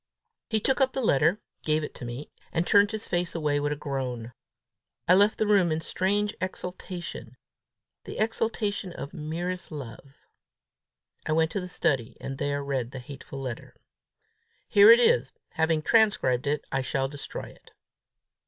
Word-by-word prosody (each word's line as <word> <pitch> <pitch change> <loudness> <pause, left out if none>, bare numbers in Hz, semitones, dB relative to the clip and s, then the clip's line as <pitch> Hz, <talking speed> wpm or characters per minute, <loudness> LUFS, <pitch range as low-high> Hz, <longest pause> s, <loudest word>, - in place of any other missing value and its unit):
He 220 - +2
took 265 +6 +1
up 265 0 +3
the 265 - -1
letter, 160 +5 +3 0.2
gave 155 0 +1
it 150 - -5
to - - -8
me, 120 +5 -7 0.2
and 165 +1 0
turned 200 +1 +5
his 220 0 -4
face 175 -1 -1
away 150 -3 +1
with 145 0 -1
a - - 0
groan. 130 -5 -4 0.7
I 180 - +7
left 205 +3 +5
the 215 - +1
room 200 -5 +4
in 155 - 0
strange 205 +5 0
exaltation 180 -9 -6 0.7
the - - -7
exaltation 215 -4 -1
of 140 - -7
merest 170 +4 -4
love. 140 -1 -9 1.1
I 155 - +1
went 160 0 +2
to 200 - -2
the 180 - -7
study, 130 -8 0
and 135 0 -6
there 145 0 -1
read 135 -4 -2
the 130 - -8
hateful 135 +1 -9
letter. 125 -4 -6 0.9
Here 205 +1 +7
it 230 +1 +10
is. 135 - +3 0.2
Having 160 -1 +1
transcribed 150 - +3
it, 145 0 0
I 135 - +1
shall 135 +1 -1
destroy 140 +1 -7
it. - - -18
155 Hz, 160 wpm, -27 LUFS, 135-200 Hz, 1.1 s, it